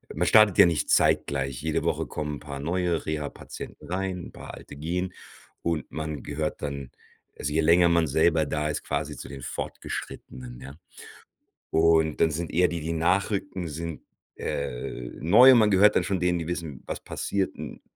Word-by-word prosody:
man 85 +3 +1
startet 110 -2 +6
ja - - +10
nicht 80 -4 -1
zeitgleich. 70 -2 +2
Jede 80 0 -1
Woche - - -1
kommen 75 -1 -4
'n - - -13
paar 70 -2 -7
neue 85 +2 -1
Rehapatienten 75 -2 -6
rein, 95 -1 -3
paar - - -10
alte - - -12
gehen 90 +5 -2 0.5
und 85 -2 -2
man 80 -1 -5
gehört 75 +1 -3
dann 70 -2 -4 0.5
also 75 - -2
je 80 - +3
länger 85 +2 +5
man 85 -1 +3
selber 80 +2 +3
da 75 +1 -1
ist, 75 - -3
quasi - - -3
zu - - -8
den 70 -1 -8
Fortgeschrittenen, 60 0 -6
ja? 70 +2 -9 1.0
Und, 80 -1 +3
dann 80 - +4
sind 85 +2 -3
eher 90 +2 +4
die, 85 -1 -4
die 80 +2 -3
nachrücken, 95 +2 0
sind, 80 +1 -6 0.3
äh, - - -4
neu 110 - +8
und 125 - +7
man 110 -2 +4
gehört 100 +2 +5
dann - - +3
schon 95 -3 -1
denen, 90 -1 +1
die 80 - -4
wissen, 80 -6 -5
was - - -4
passiert. 100 -1 -2
Und - - -8
80 Hz, 175 wpm, -26 LUFS, 75-90 Hz, 1.0 s, ja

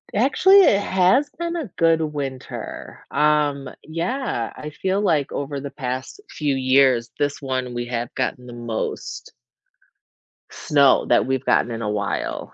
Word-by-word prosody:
Actually 360 - +5
it 200 - +5
has 195 +9 +2
been 340 +1 -4
a 300 -8 -4
good 165 -1 +3
winter, 145 -4 -6
um, 150 -2 +1
yeah, 170 - -3
I 150 - -7
feel 190 +6 -1
like 155 -9 +1
over 140 0 -3
the 140 - -6
past 130 - -5
few 145 -3 -1
years 130 -2 +3
this 145 0 -1
one 130 -2 -3
we 120 0 -4
have 120 0 -4
gotten 125 -1 -2
the 120 - -9
most 120 -2 -5 1.2
snow 140 -3 +3
that 120 - +4
we've 130 +1 -2
gotten 120 - +2
in 115 0 -4
a 105 - -2
while. 105 -1 -3
140 Hz, 150 wpm, -22 LUFS, 125-170 Hz, 1.2 s, Actually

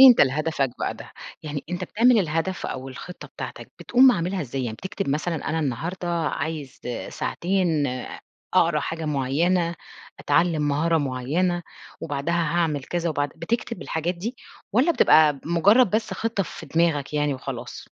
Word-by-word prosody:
أنت 245 - +7
لهدفك 140 -1 +2
بقى - - -2
ده، - - -12 0.3
يعني 145 -2 -5
أنت 175 - -2
بتعمل 235 +1 +4
الهدف 165 +1 -1
أو 130 +1 -5
الخطّة 135 +7 -9
بتاعتك، - - -8
بتقوم 255 +1 +6
عاملها 185 0 -1
إزاي، 135 -2 -3
يعني 110 -2 -4
بتكتب 190 -2 -4
مثلًا 155 +4 0
أنا 160 - 0
النهارده 160 +6 -3
عايز 155 -4 -3
آآ 125 - -4
ساعتين 175 -5 0 0.7
أقرا - - +4
حاجة 160 0 -4
مُعيّنة، 165 +5 +1 0.5
أتعلم 165 -3 +2
مهارة 160 +3 +2
مُعيّنة، 150 +7 0 0.4
وبعدها 145 +2 -2
هاعمل 165 -4 0
كذا 175 -1 -2
وبعد 145 -1 0
بتكتب 225 +4 -3
الحاجات 165 +3 -2
دي، 220 +9 -5 0.4
والّا 270 +10 +4
بتبقى 155 - +6
ب - - -15
مُجرّد 195 +7 +5
بس 215 +1 0
خطّة 225 -3 -1
في 165 -3 -9
دماغك 155 -2 +1
يعني 150 -1 +1
وخلاص؟ 130 -2 -7
165 Hz, 150 wpm, -24 LUFS, 145-180 Hz, 0.7 s, أنت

